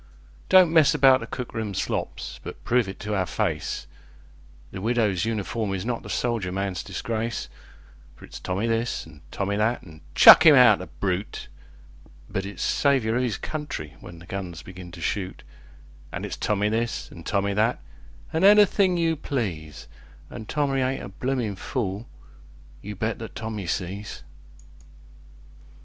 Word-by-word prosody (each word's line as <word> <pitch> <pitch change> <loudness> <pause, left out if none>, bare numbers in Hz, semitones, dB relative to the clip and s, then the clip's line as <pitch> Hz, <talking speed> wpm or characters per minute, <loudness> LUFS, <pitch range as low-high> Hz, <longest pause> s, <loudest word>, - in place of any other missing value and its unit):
Don't 185 -3 +6
mess 160 -4 +5
about 135 -1 +6
the - - -7
cook 125 -2 -6
room 110 -4 -3
slops, - - -3
but - - -9
prove 120 -4 +2
it 95 - -8
to 105 +1 -3
our 95 -2 +1
faceThe - - -2 0.9
Widow's 110 -3 +1
Uniform 110 -2 -2
is 95 +1 -4
not 120 -1 -2
the - - -10
soldier 115 -7 -1
man's 95 -1 -2
disgrace. 115 +4 -3 0.7
For - - -13
it's - - -10
Tommy 95 +4 -2
this, 115 +1 -1
an' 80 -2 -15
Tommy 100 +1 -2
that, 110 +3 0
an' 80 -3 -14
"Chuck - - +10
him - - +9
out, - - +7
the - - -7
brute!" 95 +1 -3 0.8
But 95 0 -3
it's 100 -3 -5
"Saviour 130 -6 +2
of 125 - +1
'is 115 -6 -1
country" 150 - -5
when 85 - -11
the 85 - -13
guns 90 -4 -6
begin 90 -1 -10
to 85 - -9
shoot; 95 +2 -3 0.7
An' - - -4
it's - - -5
Tommy 105 0 0
this, 115 +2 -2
an' 85 - -11
Tommy 100 +1 0
that, 110 +4 +1 0.5
an' 160 +3 +1
anything 200 -2 +6
you 165 -1 +1
please; 95 - -4 0.4
An' 110 - -8
Tommy 140 -3 0
ain't 130 +1 -1
a - - -7
bloomin' 120 0 -2
fool 105 +1 -3 0.7
you 105 +1 -7
bet 110 +3 -2
that 110 - -8
Tommy 110 -4 -5
sees! 100 +4 -4
105 Hz, 160 wpm, -25 LUFS, 95-125 Hz, 0.9 s, Chuck